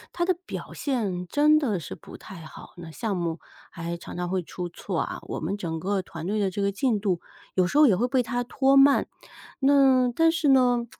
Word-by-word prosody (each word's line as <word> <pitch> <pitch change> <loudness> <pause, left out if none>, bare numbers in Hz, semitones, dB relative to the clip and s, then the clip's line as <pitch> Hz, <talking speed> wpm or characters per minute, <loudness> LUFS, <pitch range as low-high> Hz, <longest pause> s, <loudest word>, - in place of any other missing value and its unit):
他 345 - -1
的 370 - +2
表 - - -7
现 205 -10 -2
真 300 - +4
的 230 - -1
是 - - -7
不 - - -13
太 190 - -12
好， 155 - -12
那 170 -2 -9
项 210 +3 -3
目 170 -1 -3 0.3
还 170 +1 -5
常 170 - -10
常 175 0 -3
会 185 -1 -1
出 175 +1 -6
错 175 0 -4
啊， - - -4
我 - - -6
们 180 +6 -2
整 165 -5 -4
个 195 +3 -1
团 165 -2 -8
队 210 +2 -1
的 200 -2 +1
这 200 +2 -3
个 200 - +1
进 220 0 0
度， 190 -4 -1 0.3
有 185 -1 +3
时 185 - -3
候 300 - +7
也 205 -8 +4
会 235 +6 +1
被 260 -1 +2
他 245 +1 -3
拖 270 +2 +2
慢。 275 +1 +5 0.5
那 270 -2 +4
但 325 +3 +4
是 325 -3 0
呢， 250 -3 +4
210 Hz, 240 characters per minute, -25 LUFS, 180-270 Hz, 0.5 s, 候